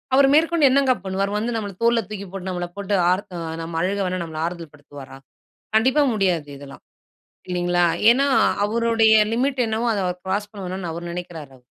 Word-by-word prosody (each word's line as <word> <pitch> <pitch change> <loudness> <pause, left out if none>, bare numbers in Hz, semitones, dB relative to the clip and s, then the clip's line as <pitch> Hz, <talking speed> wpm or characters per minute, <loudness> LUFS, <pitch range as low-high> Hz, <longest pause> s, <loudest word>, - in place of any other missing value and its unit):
அவர் 275 0 +6
மேற்கொண்டு 325 -2 +4
என்னங்க 270 -1 +3
பண்ணுவாரு? 190 +1 -1
அவர் 210 - -1
வந்து 230 +2 -2
நம்மள 205 -3 -5
தோல்ல 235 0 +3
தூக்கி 205 -2 -6
போட்டு 190 -1 -6
நம்மள 175 -1 -3
போட்டு 200 0 -1
ஆறத் 185 +1 -1
அ - - -5 0.2
நம்ம 165 0 -5
அழுக 195 +3 -1
வேணா 180 0 -3
நம்மள 160 -1 -7
ஆறுதல் 170 -3 -6
படுத்துவாரா? 145 -2 -12 0.6
கண்டிப்பா 260 +7 +3
முடியாது 180 -8 0
இதெல்லாம். 140 -1 -12 0.6
இல்லிங்களா, 175 0 +1 0.3
ஏன்னா 275 +4 +3 0.4
அவருடைய 225 0 +3 0.2
லிமிட் 260 +2 0
என்னவோ 225 +2 -1
அத 205 - -1
அவர் 180 0 -4
க்ராஸ் 205 +2 -2
பண்ண 200 -3 -9
வேணான்னு 180 -1 -5
அவரு 170 +1 -6
நினைக்கிறாரு. 160 -6 -8
195 Hz, 180 wpm, -22 LUFS, 175-230 Hz, 0.6 s, அவர்